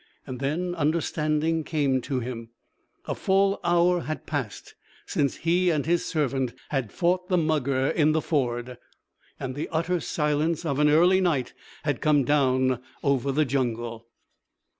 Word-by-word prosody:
And 125 -1 -6
then 165 +6 -1
understanding 155 0 0
came 140 -5 0
to 130 -3 0
him. 115 -1 -6 0.6
A - - -2
full 195 +1 +2
hour 175 +1 +3
had 155 -1 -5
passed 135 -10 -5 0.3
since 140 -2 0
he 175 +2 +1
and 155 -4 0
his 170 +1 +1
servant 135 -5 -1
had 135 -8 -2
fought 180 +2 0
the 180 - +3
mugger 140 -5 +1
in 155 -1 +3
the 160 - +2
ford. 125 -5 -2 0.6
And 130 -1 -4
the 145 +4 -4
utter 170 +2 0
silence 150 +2 -1
of 140 -3 -1
early 165 +6 +5
night 155 -9 0 0.3
had 145 -4 -1
come 150 -2 +3
down 130 -2 +2 0.2
over 140 -1 +1
the 150 +3 +2
jungle. 120 -3 -2
150 Hz, 145 wpm, -26 LUFS, 130-165 Hz, 0.6 s, early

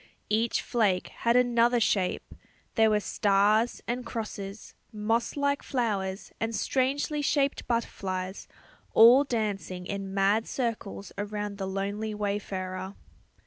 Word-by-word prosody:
Each 225 +2 +1
flake 205 -6 +1
had 235 0 0
another 240 -1 +4
shape; 195 -4 0 0.4
there 220 -1 +4
were 210 -1 +3
stars 210 +4 +2
and 245 +1 -2
crosses, 210 -3 -6 0.2
moss 225 +4 -1
like 285 0 +1
flowers 205 -7 -2
and 225 0 -2
strangely 280 +5 0
shaped 280 -1 +1
butterflies, 190 -5 -3 0.5
all 240 +5 +8
dancing 200 - -3
in 195 0 -4
mad 200 +3 +2
circles 225 -5 -3
around 205 0 -4
the 190 - -2
lonely 200 +3 -3
wayfarer. 195 -2 -3
215 Hz, 115 wpm, -28 LUFS, 195-235 Hz, 0.5 s, all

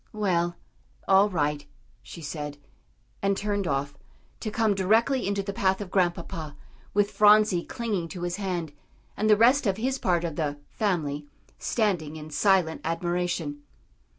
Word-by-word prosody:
"Well, 175 -5 0 0.5
all 195 +2 +5
right," 150 -5 -1 0.4
she 170 - -10
said, 150 -1 -5 0.6
and 195 0 +1
turned 205 -2 -1
off, 140 0 -1 0.5
to 220 - -3
come 220 -1 +2
directly 220 +6 +2
into 200 0 0
the 200 0 -4
path 190 -1 +1
of 200 -3 -6
Grandpapa, 170 -5 -1 0.4
with 205 0 +3
Phronsie 210 -4 +5
clinging 210 -8 -3
to 175 +1 -7
his 175 +1 -2
hand, 175 -6 -3 0.4
and 215 +1 0
the 210 - +6
rest 245 +3 +5
of 195 -1 +1
his 260 +4 -1
part 175 -2 +1
of 165 -3 -4
the 145 -2 -1
"family" 150 -9 -1 0.3
standing 180 -9 0
in 155 0 -9
silent 180 0 +2
admiration. 175 -2 -2
185 Hz, 150 wpm, -27 LUFS, 160-205 Hz, 0.6 s, the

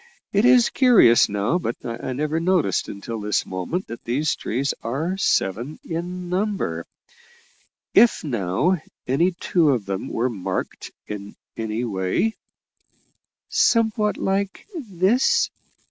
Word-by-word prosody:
It 205 +3 +3
is 250 -1 +5
curious 230 - +6
now, 105 - 0
but 120 -9 -3
I 120 +2 -4
never 150 +4 -1
noticed 170 - +1
until 110 +2 -6
this 105 0 0
moment 95 - -3
that 115 - -9
these 145 +6 0
trees 130 +4 -2
are 155 +11 -2
seven 120 - 0
in 175 +2 -4
number. 195 +3 -2 1.1
If, 240 - +5
now, 130 - 0 0.2
any 145 +8 +2
two 170 -2 +1
of 120 -7 +1
them 95 -1 -3
were 120 +2 0
marked 105 -7 -4 0.2
in 100 -1 -7 0.2
any 110 +1 -3
way 100 - 0 0.6
" - - -44
"Somewhat 225 - +2
like 195 0 -2
this?" 215 - +2
155 Hz, 125 wpm, -23 LUFS, -, 1.1 s, curious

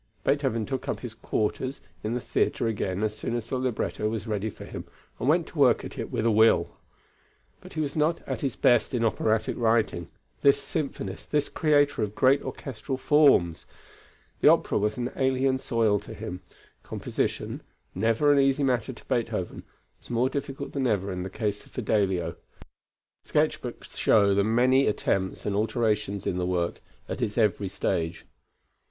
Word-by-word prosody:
Beethoven 135 -6 +1
took 130 +1 -4
up - - -2
his 120 -3 -6
quarters 120 +4 -2 0.2
in 110 +3 -1
the - - 0
theatre 120 - 0
again 100 -3 -1
as 105 0 -1
soon 115 +2 -3
as 120 -2 -3
the 130 - -1
libretto 120 -3 -1
was 110 -1 -3
ready 110 -1 -2
for - - -10
him - - -7 0.4
and 125 - 0
went 165 +2 +3
to 155 - -9
work 130 -4 +4
at - - -8
it - - -4
with 110 - -1
a 115 - +4
will. 110 -5 +4 0.8
But - - -13
he 155 - -1
was 145 -2 -3
not 155 +2 0
at 130 -4 -3
his 135 -5 -1
best 120 +1 +3
in 115 -1 +1
operatic 110 0 +1
writing, 110 -7 +1 0.3
this 140 -1 +5
symphonist, 135 - -4
this 150 -1 +1
creator 145 -4 +2
of 105 -1 -2
great 135 +2 +4
orchestral 130 +1 -5
forms. 130 - +4 0.7
The - - +4
opera - - +4
was 105 +1 0
an 125 +1 -2
alien 130 0 +1
soil 110 -5 +1
to - - -10
him; 90 +1 -6 0.4
composition - - -3 0.3
never 115 +9 +3
an 140 - +4
easy 135 +1 +3
matter 130 -1 0
to - - -16
Beethoven, 115 -6 -2 0.4
was - - -18
more 120 +2 +2
difficult 140 0 -4
than 135 -2 0
ever 100 -4 0
in 90 -1 -4
the 95 - -4
case 105 +1 -3
of - - -21
Fidelio. 95 -7 0 0.9
The - - -21
sketch - - +2
books - - -8
show 100 -2 +4
the 100 0 +3
many 125 +5 +3
attempts 95 -2 -1
and 100 - -1
alterations 105 -2 0
in 90 - -1
the 90 - -1
work, 85 -2 -1 0.3
at - - -5
its 110 -2 -2
every 105 -3 +2
stage. 85 -3 -2
115 Hz, 180 wpm, -27 LUFS, 105-130 Hz, 0.9 s, this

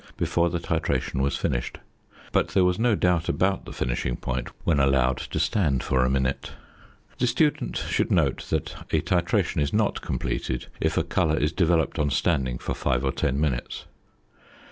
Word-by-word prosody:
before 85 0 +1
the 85 - -1
titration 65 -4 -1
was 70 +1 0
finished, - - -2 0.5
but - - +2
there 95 - +2
was 90 +1 +1
no 115 -1 +3
doubt 90 -3 +1
about 95 +1 +1
the - - -8
finishing - - -2
point 65 0 -3 0.2
when 80 -4 +2
allowed 65 -2 +3
to - - -5
stand 75 - +1
for 65 -1 +2
a 65 - +2
minute. 65 0 -1 0.7
The 125 - +2
student 145 +5 +1
should - - -1
note - - +1
that - - -1 0.2
a - - +2
titration 85 -3 +1
is 70 0 0
not 105 -1 +1
completed 65 -1 -3
if 80 +1 0
a 90 - +3
colour 85 -2 +1
is 75 +2 +1
developed 85 -2 +1
on 75 -1 +2
standing 65 -3 0
for - - -4
five 65 -1 0
or 65 - +1
ten 65 +1 -1
minutes. 70 -6 -2
75 Hz, 175 wpm, -25 LUFS, 65-90 Hz, 0.7 s, no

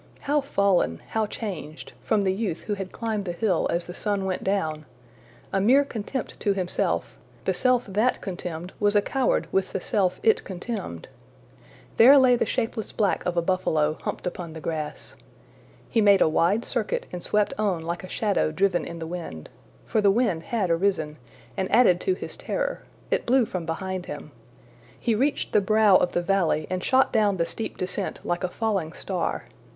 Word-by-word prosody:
``How 290 0 +2
fallen, 195 - +1
how 220 -1 0
changed,'' 185 -8 -6
from 215 -3 +1
the 190 -1 +2
youth 195 -4 -2
who 210 - -3
had 195 -2 -5
climbed 220 -3 -3
the 175 - -2
hill 185 -2 +1
as 170 0 -1
the 175 - -8
sun 200 0 -1
went 185 -1 -2
down! 160 -6 -1 0.7
A 195 - +2
mere 265 +7 +5
contempt 240 +1 -5
to 205 - +1
himself, 185 -2 -1 0.3
the - - +2
self 250 -1 +2
that 215 +5 +1
contemned 175 -2 -6
was 205 0 +2
a 205 - +6
coward 265 +2 +1
with 190 -1 0
the - - -1
self 185 -2 0
it 450 0 +4
contemned! 190 - -6 0.9
There 265 +5 +9
lay 255 -2 +6
the 240 - 0
shapeless 225 -3 -2
black 205 -3 0
of 175 -1 -1
a 170 - +3
buffalo, 160 -4 +1
humped - - -4
upon 175 -2 -5
the 160 - -7
grass. 155 -2 -5 0.7
He 225 - +2
made 200 -2 +6
a - - +6
wide 175 +8 +2
circuit 235 -4 -2
and 180 - -5
swept 210 -1 +1
on 190 -6 0
like 170 +3 -4
a 185 - -8
shadow 200 -7 0
driven 185 +2 +1
in 170 - -7
the 165 - -5
wind. 165 - -7 0.4
For 220 - +1
the 200 - +5
wind 200 -6 +2
had 205 -7 0
arisen, 165 -4 0 0.4
and 190 - -2
added 215 -6 +5
to 375 - +1
his - - -7
terror: - - -2 0.3
it - - 0
blew 255 0 +4
from 185 -5 -5
behind 185 +2 -3
him. - - -7 0.7
He 235 - +1
reached 270 +7 0
the 210 - +5
brow 215 -1 +5
of 180 - 0
the 175 - 0
valley 175 -5 +1
and 185 0 -2
shot 260 0 +3
down 210 -3 +3
the 170 - +1
steep 225 - -5
descent 185 - -2
like 175 +1 -2
a 185 - 0
falling 195 -6 -1
star. 180 -4 -3
195 Hz, 190 wpm, -25 LUFS, 175-220 Hz, 0.9 s, There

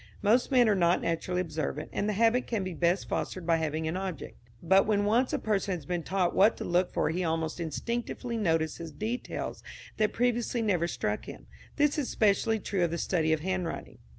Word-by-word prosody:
Most 225 +5 +3
men 250 -4 +5
are 215 - +4
not 175 -2 +3
naturally 175 +2 -1
observant, 155 -3 -4
and 205 - -1
the - - +1
habit 230 +4 +2
can 225 -5 -1
be 185 -1 -4
best 175 +3 +1
fostered 185 -2 -3
by 165 -1 +3
having 160 0 -2
an 160 - -2
object; 185 -6 -5 0.3
but 195 +4 +4
when 205 -1 +2
once 235 +5 +2
a - - +1
person 200 -3 0
has 160 -5 -9
been 175 +2 -2
taught 185 +1 0
what 210 +4 +5
to - - -5
look 175 +1 +1
for - - 0
he 180 +3 -1
almost 160 0 -1
instinctively 235 - -3
notices 165 -5 -1
details 220 - -4 0.4
that 215 -1 +2
previously 240 0 0
never 180 -6 +1
struck - - -2
him. - - -10 0.3
This 295 0 +2
is 275 - -2
specially 220 +1 +2
true 195 -2 -1
of 170 - +2
the 170 - -3
study 160 -3 0
of 160 -1 +1
handwriting. 185 -1 -3
185 Hz, 205 wpm, -29 LUFS, 165-220 Hz, 0.4 s, men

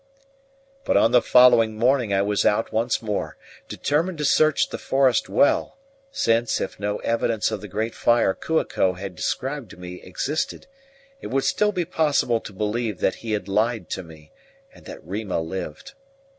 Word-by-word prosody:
But - - +2
on 115 - +4
the 125 - +5
following 120 -3 +5
morning 120 0 +2
I 100 0 +2
was 105 0 0
out 105 +2 +1
once 115 +2 0
more, 105 -2 -3 0.3
determined 165 +5 -1
to 150 - -2
search 155 +1 +3
the - - -6
forest 135 -3 +2
well; 310 +3 +2 0.3
since, 115 - +1
if - - -5
no 105 0 -2
evidence 115 -1 0
of 110 - -4
the 105 - -8
great 110 +4 -3
fire 120 -5 +2
Kua 160 +9 -1
ko 95 - 0
had 95 0 -7
described 135 - -3
to - - -13
me 90 0 -9
existed, 140 - -3 0.6
it - - -6
would 135 +1 0
still 210 0 +2
be 180 -4 -2
possible 150 -8 +1
to 105 - -10
believe 105 +1 -2
that - - 0
he 115 -2 -3
had 105 - -2
lied 105 -1 -1
to - - -3
me, 80 -3 -15 0.4
and - - -18
that - - -10
Rima 100 -1 -3
lived. 95 - -6
115 Hz, 175 wpm, -23 LUFS, 100-135 Hz, 0.6 s, the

